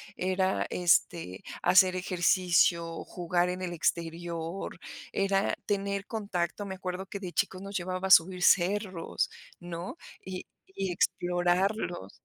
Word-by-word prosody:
era, 185 +1 0
este, 170 - +1 0.2
hacer 185 0 +6
ejercicio, 175 -2 +2
jugar 175 0 0
en 185 +1 -4
el 175 -1 -3
exterior, 170 +2 -3 0.3
era 195 0 +1
tener 200 -1 -1
contacto, 200 -3 -3
me 190 - -5
acuerdo 185 0 -5
que 200 - -6
de 185 -3 -6
chicos 185 +4 -1
nos 200 0 -7
llevaba 185 +1 -2
a - - +1
subir 180 +1 +6
cerros, 190 -1 +2 0.3
¿no? 175 - -6 0.3
Y 185 -1 -6 0.3
y 195 -2 -1
explorarlos. 175 - 0
180 Hz, 120 wpm, -29 LUFS, 175-190 Hz, 0.3 s, hacer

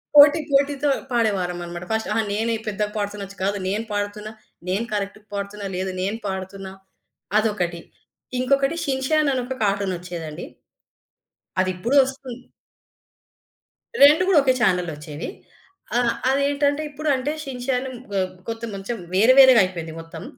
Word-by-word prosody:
పోటీ 290 +2 +9
పోటీతో 280 +1 +2 0.2
పాడేవాళ్లమనమాట. 180 -6 -1
ఫస్ట్ 220 0 -1
అహా! 225 - +2
నేనే 225 +2 0
పెద్దగా 210 0 -1
పాడుతున్నొచ్చు. 205 -1 -4
కాదు 200 +1 0
నేను 210 +3 -1
పాడుతున్నా. 205 +1 -3 0.4
నేను 200 +5 0
కరెక్ట్‌గా 205 +1 -4
పాడుతున్నా. 200 +1 -5
లేదు 190 +1 -2
నేను 200 +4 -1
పాడుతున్నా. 190 0 -5 0.7
అదొకటి. 180 -6 -1 0.6
ఇంకొకటి 275 +4 +2
'షిన్ 265 -3 -1
చాన్' 310 -2 +3
అని 255 - 0
ఒక 260 +1 -4
కార్టూన్ 200 -2 +1
ఒచ్చేదండి. 170 -3 -7 1.2
అదిప్పుడు 185 +8 -1
ఒస్తుంది. 260 -2 -7 1.6
2 300 +5 +7
గూడా 370 -6 +6
ఒకే 260 -2 +4
చానెల్‌లో 180 -6 +2
ఒచ్చేవి. 150 0 -7 0.7
ఆహ్, 240 -1 +2 0.2
అదేంటంటే 285 +2 +1
ఇప్పుడు 300 +1 -3
అంటే 260 +3 -2
'షిన్ 255 -3 -6
చాన్' 260 0 0 0.3
ఆహ్, 185 -1 0 0.2
కొంత 225 0 -5
కొంచెం 195 +5 -4 0.2
వేరే 220 +7 +6
వేరేగైపోయింది 185 -11 +5
మొత్తం. 165 0 -10
215 Hz, 130 wpm, -23 LUFS, 190-265 Hz, 1.6 s, పోటీ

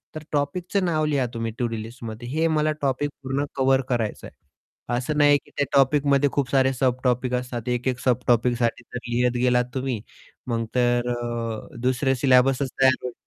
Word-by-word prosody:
तर 155 - -6
टॉपिकचं 180 +7 0
नाव 155 -3 +1
लिहा 140 -4 +1
तुम्ही 115 0 -3
टू-डू 120 -2 -1
लिस्टमध्ये 115 +1 -8
हे 160 +5 +1
मला 155 0 +2
टॉपिक 140 +1 0
पूर्ण 135 +2 -1
कव्हर 135 0 +3
करायचं 115 -4 -2
आहे. - - -17 0.6
असं 150 +5 -2
नाही 145 -1 +6
की - - -21
त्या 145 - +2
टॉपिकमध्ये 140 0 +3
खूप 135 -3 0
सारे 135 -1 +3
सब 130 -1 0
टॉपिक 125 0 +1
असतात. 125 -2 -4
एक, 125 +1 -1
एक 125 -1 0
सब 125 -2 +1
टॉपिकसाठी 120 0 +1
जर 125 - -3
लिहत 125 0 +1
गेलात 125 -1 +3
तुम्ही 130 -4 -2 0.5
मग 115 -2 -1
तर 120 0 +2
अ, 120 -2 -5
दुसरे 130 +1 +1
सिलेबसच 130 +1 +3
तयार 130 -1 +6
होईल. 125 -1 -4
125 Hz, 175 wpm, -24 LUFS, 120-140 Hz, 0.6 s, नाही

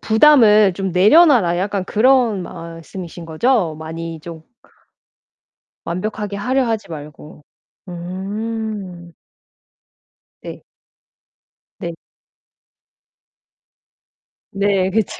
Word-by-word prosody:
"부담을 220 -4 +5
좀 195 -2 -3
내려놔라." 215 - +5
약간 195 0 -2
그런 230 -3 +2
말씀이신 170 +1 -9
거죠? 175 0 +1
많이 165 0 -7
좀 165 -1 -10 1.4
완벽하게 205 +3 -4
하려 255 +6 0
하지 225 -4 -3
말고. 150 0 -11 0.4
음. 190 0 -6 1.3
네. - - -9 1.2
네. 170 -1 -5 2.6
네 195 -1 +1
그쵸. 215 0 -1
195 Hz, 145 characters per minute, -19 LUFS, 170-220 Hz, 2.6 s, 부담을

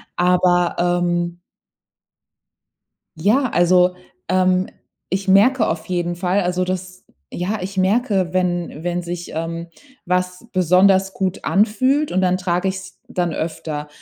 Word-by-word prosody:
Aber, 175 -1 +2 0.3
ähm 175 0 -1 1.8
ja, 225 - +2
also, 180 +1 +3 0.3
ähm, 185 0 +2 0.4
ich 190 +1 -2
merke 220 +5 +4
auf 160 0 -3
jeden 175 -1 -2
Fall, 180 +3 0
also, 180 0 0
das 185 0 -4 0.3
ja, 190 +3 -2
ich 195 +1 -6
merke, 190 -2 +1
wenn 175 -4 -1
wenn 175 0 -1
sich, 175 0 -6
ähm, 165 +1 -4 0.4
was 180 +3 -1
besonders 190 +2 +3
gut 190 -1 -2
anfühlt, 260 +9 +2
und 185 - +1
dann 185 -1 +2
trage 180 +1 -1
ich's 190 -1 -6
dann 175 -2 -2
öfter. 155 -2 -4
180 Hz, 125 wpm, -20 LUFS, 175-190 Hz, 1.8 s, merke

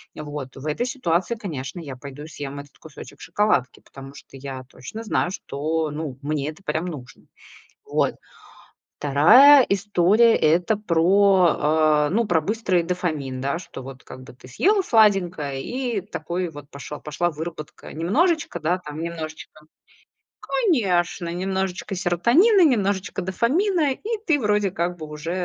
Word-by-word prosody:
Э - - -7
вот. 145 -3 -6
В 135 +2 -10
этой 155 +11 -1
ситуации, 235 - -1
конечно, 165 - -6
я 140 -5 -7
пойду 140 +3 -10
и - - -9
съем 140 -2 -7
этот 145 0 -13
кусочек 145 -2 -13
шоколадки, 205 - 0
потому 135 0 -12
что - - -14
я 130 -1 -7
точно 215 - -9
знаю, 190 -4 0
что, 155 -1 -3
ну, 150 -3 -5
мне 150 -1 -2
это 155 +5 -11
прям 160 -2 -2
нужно. 130 -7 -9 0.6
Вот. - - 0 0.8
Вторая 235 - +7
история- 205 +3 +3
это 175 +7 +2
про, 190 0 +3
а, 155 -1 +3
ну 230 +5 +1
про 170 -5 +2
быстрый 190 -1 0
дофамин, 155 -7 -3
да. 140 +5 -1
Что 135 - -10
вот 130 -1 -10
как 130 0 -11
бы - - -13
ты 125 - -16
съела 395 - +2
сладенькое, 185 - +2
и 245 -5 -3
такой 175 -1 -4
вот 145 -2 -11
пошёл 140 +1 -8
пошла 155 +4 -2
выработка 155 -1 -8
немножечко, 275 - 0
да, 175 +4 0
там 150 -3 -8
немножечко 160 -2 -7 0.8
Конечно, 200 - 0
немножечко 190 +2 -3
серотонина, 235 - +4
немножечко 200 -7 0
дофамина 290 - +1
и 445 - -4
ты 310 -4 +3
вроде 210 -3 +1
как 175 0 -2
бы 155 -2 -8
уже, 150 +2 -6
175 Hz, 150 wpm, -23 LUFS, 150-210 Hz, 0.8 s, Вторая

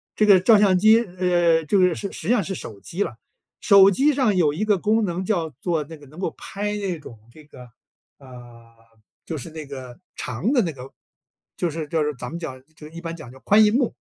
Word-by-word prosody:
这 215 - +3
个 200 -3 +7
照 215 +4 +5
相 195 -3 +4
机 220 +4 +6
呃， 175 -5 +1
这 200 - +1
个， 180 -3 +3
是 200 - -6
实 160 - -8
际 240 - +4
上 210 - +1
是 190 - -5
手 105 -9 -9
机 180 - -3
啦， - - -7 0.4
手 200 -2 +7
机 280 +9 +2
上 255 -8 +1
有 155 -5 +2
一 195 +8 -2
个 210 -2 +2
功 215 +3 +1
能 180 +1 -3
叫 175 -6 -1
做 165 -4 -1
那 160 +1 -11
个 145 - -16
能 155 +6 -14
够 190 - -2
拍 205 +1 -4
那 190 -5 -3
种 120 -6 -12
这 155 +2 -16
个， 130 -4 -15 0.6
啊， 120 -3 -15 0.5
就 160 - -5
是 145 - -8
那 155 -1 -8
个 130 0 -10 0.2
长 125 - -3
的 250 - +4
那 170 -5 -2
个， 130 0 -11 0.7
就 175 - -1
是 155 -1 -5
就 160 -1 0
是 150 0 -2
咱 125 0 -7
们 170 - -6
讲 130 -6 -7
就 150 -1 -12
一 165 +2 -10
般 165 -1 -6
讲 125 -7 -11
叫 130 - -15
宽 210 +8 +4
荧 210 0 +3
幕。 250 -2 +1
170 Hz, 250 characters per minute, -22 LUFS, 150-205 Hz, 0.7 s, 个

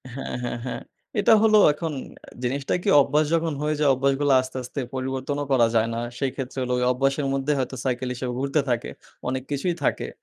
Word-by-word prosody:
হ্যাঁ, 135 - -5
হ্যাঁ, 120 0 -3
হ্যাঁ। 125 - -4 0.4
এটা 210 - +5
হলো 215 -1 +6 0.2
এখন 160 +1 -4 0.5
জিনিসটা 135 +2 -1
কি - - +1
অভ্যাস 150 +3 +2
যখন 165 -1 0
হয়ে 150 +1 0
যায় 150 -2 +4
অভ্যাসগুলো 140 +2 +1
আস্তে, 130 0 -7
আস্তে 125 +3 -6 0.2
পরিবর্তনও 130 +2 -2
করা 120 -3 +5
যায় 110 0 +3
না। 115 - -2 0.2
সেইক্ষেত্রে 135 -1 -3
হলো 125 0 -1
ওই - - 0
অভ্যাসের 135 +2 0
মধ্যে 135 +2 0
হয়তো 130 0 -2
cycle 125 0 -1
হিসেবে 125 0 -4
ঘুরতে 140 +3 +1
থাকে। 120 -1 -1 0.4
অনেক 130 0 -2
কিছুই 145 +5 0
থাকে। - - 0
135 Hz, 190 wpm, -24 LUFS, 125-145 Hz, 0.5 s, হলো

